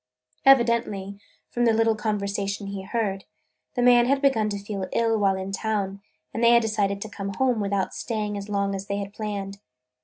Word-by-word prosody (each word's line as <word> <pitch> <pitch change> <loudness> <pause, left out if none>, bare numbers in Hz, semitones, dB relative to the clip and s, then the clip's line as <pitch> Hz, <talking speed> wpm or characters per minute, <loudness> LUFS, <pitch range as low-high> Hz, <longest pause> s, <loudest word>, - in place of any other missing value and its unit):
Evidently, 235 -6 +3 0.3
from 240 0 +1
the 230 - +4
little 225 0 +3
conversation 200 -1 -2
he 200 -1 -5
heard, 195 -1 -2 0.5
the 245 - +1
man 245 -1 +6
had 275 +1 +2
begun 255 -7 +2
to 205 - -3
feel 200 -1 -5
ill 230 -1 +2
while 195 -2 +3
in 190 +1 -5
town 200 -1 -2 0.3
and 230 - -2
they 235 0 +7
had 235 0 +5
decided 205 -2 0
to - - -7
come 200 -2 -6
home 255 -4 +1
without 200 -2 -1
staying 210 -3 -3
as 200 0 -6
long 200 -1 0
as 195 0 -5
they 200 - -2
had 200 0 -5
planned. 200 -2 -5
210 Hz, 190 wpm, -25 LUFS, 200-225 Hz, 0.5 s, they